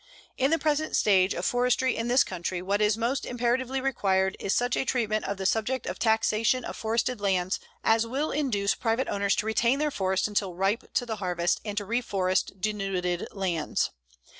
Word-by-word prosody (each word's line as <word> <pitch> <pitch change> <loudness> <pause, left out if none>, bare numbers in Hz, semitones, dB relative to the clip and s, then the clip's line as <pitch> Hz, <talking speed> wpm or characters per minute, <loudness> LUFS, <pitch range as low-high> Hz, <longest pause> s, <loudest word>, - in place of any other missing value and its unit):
In 265 +1 +2
the 325 - +3
present 310 -1 0
stage 190 -2 +3
of 175 - -3
forestry 250 +1 +2
in 230 - -2
this 250 +2 +5
country, 180 0 -4
what 200 +3 -1
is 210 +1 +3
most 245 +4 -1
imperatively 245 +2 -1
required 190 -8 +1
is 195 - -2
such 245 +2 +1
a - - 0
treatment 220 -5 0
of 200 - -3
the 190 - -4
subject 225 +6 0
of - - -5
taxation 225 +2 +2
of - - -5
forested 230 +1 -1
lands 190 -2 0 0.2
as 225 +1 +3
will 275 +6 -1
induce 225 -9 +1
private 230 +2 -1
owners 200 -1 +1
to 210 - -1
retain 235 +4 +2
their 300 0 0
forests 190 -3 0
until 200 -3 -1
ripe 195 +5 -1
to 245 - +1
the 220 -2 -4
harvest 175 -3 0
and 210 -2 -5
to 205 - -1
reforest 195 -4 -1
denuded 190 -3 -2
lands. 185 -5 -1
215 Hz, 190 wpm, -27 LUFS, 190-245 Hz, 0.2 s, this